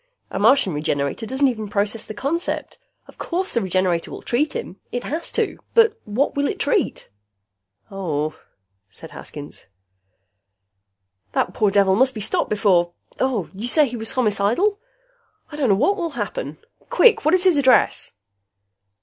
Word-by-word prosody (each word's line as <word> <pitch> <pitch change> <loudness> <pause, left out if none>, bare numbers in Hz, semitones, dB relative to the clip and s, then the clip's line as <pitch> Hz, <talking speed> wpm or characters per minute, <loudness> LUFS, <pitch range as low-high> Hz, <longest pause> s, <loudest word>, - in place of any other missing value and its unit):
A - - -3
Martian 225 - +4
Regenerator 145 - -2
doesn't 265 +3 +2
even 220 -4 -3
process 205 +2 -2
the 215 - -7
concept. 300 +10 -3 0.3
Of - - -17
course 370 +2 -2
the 235 - +1
Regenerator 185 -3 0
will - - -9
treat 280 +5 0
him. 190 - -5
It 245 0 -3
has 320 +4 -3
to. - - -1 0.2
But 450 -1 +4
what 235 +8 0
will 285 0 +1
it 395 - -3
treat?" 425 -7 0 0.8
"Oh," 155 -6 -2 0.5
said 160 +12 -11
Haskins. 145 -1 -9 1.7
"That - - 0
poor 210 - +2
devil 195 -1 +3
must 260 +4 +3
be - - -4
stopped 210 - -1
before 185 -5 +2 0.3
you 225 -4 -2
say 300 +3 +4
he 245 - -6
was 225 +2 -3
homicidal? 245 - +1 0.7
I - - -7
don't 280 -5 0
know 200 - +5
what 340 - +2
will 340 -3 -2
happen! - - -4 0.3
Quick, 485 -2 +5
what 310 +4 +4
is 365 - +2
his 360 -6 +4
address?" 260 -3 +3
235 Hz, 155 wpm, -22 LUFS, 195-295 Hz, 1.7 s, know